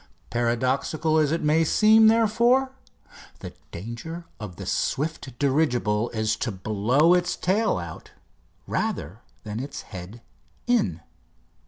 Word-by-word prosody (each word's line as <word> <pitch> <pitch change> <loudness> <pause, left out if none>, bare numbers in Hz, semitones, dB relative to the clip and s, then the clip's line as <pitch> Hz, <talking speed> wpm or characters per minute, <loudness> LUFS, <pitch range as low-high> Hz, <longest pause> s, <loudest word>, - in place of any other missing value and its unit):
Paradoxical 130 +7 0
as 150 -2 +2
it 165 - -1
may 155 +2 +3
seem, 220 +6 +5
therefore, 235 +4 +3 0.7
the - - -9 0.2
danger 120 - -7
of 105 -5 -7
the - - -8
swift 145 -3 -2
dirigible 120 -6 +1
is 110 -1 -1
to 115 +1 -3
blow 110 - +2
its 180 -1 +1
tail 210 +4 +1
out 85 -3 -8 0.6
rather 95 +11 -3 0.2
than 105 +1 -5
its 140 +2 -6
head 95 +5 -9 0.4
in. 100 - +1
135 Hz, 120 wpm, -25 LUFS, 110-170 Hz, 0.7 s, seem